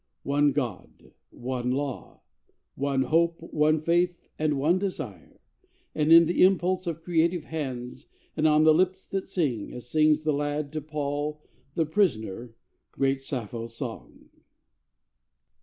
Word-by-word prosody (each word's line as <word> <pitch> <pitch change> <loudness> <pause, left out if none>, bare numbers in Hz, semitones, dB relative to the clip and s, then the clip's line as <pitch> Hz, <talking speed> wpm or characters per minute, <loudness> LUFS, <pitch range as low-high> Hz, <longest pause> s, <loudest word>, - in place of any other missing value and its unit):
One 145 +1 +2
God, 125 -9 -5 0.2
One 125 0 -4
Law, 135 0 -4 0.5
one 135 -1 0
Hope, 165 +5 +2 0.2
one 155 +1 +3
Faith, 175 +2 +2 0.2
and 150 -2 +1
one 160 +7 +2
Desire, 195 -1 -6 0.6
Are - - -2
in 165 +2 +7
the 175 - 0
impulse 185 0 +3
of 165 -1 -4
creative 170 0 +1
hands, 130 -6 -6 0.3
And 155 0 +2
on 155 0 +4
the 155 0 +7
lips 185 +3 +1
that 195 -1 -3
sing 140 - -1
as 120 0 -10
sings 155 0 +3
the 155 -1 +1
lad 145 0 -2
To 155 - -3
Paul 150 0 -3 0.4
the 165 - +2
prisoner, 120 - -1 0.4
great 135 0 0
Sappho's 115 -3 -5
song! 120 -4 -8
150 Hz, 135 wpm, -27 LUFS, 135-165 Hz, 0.6 s, in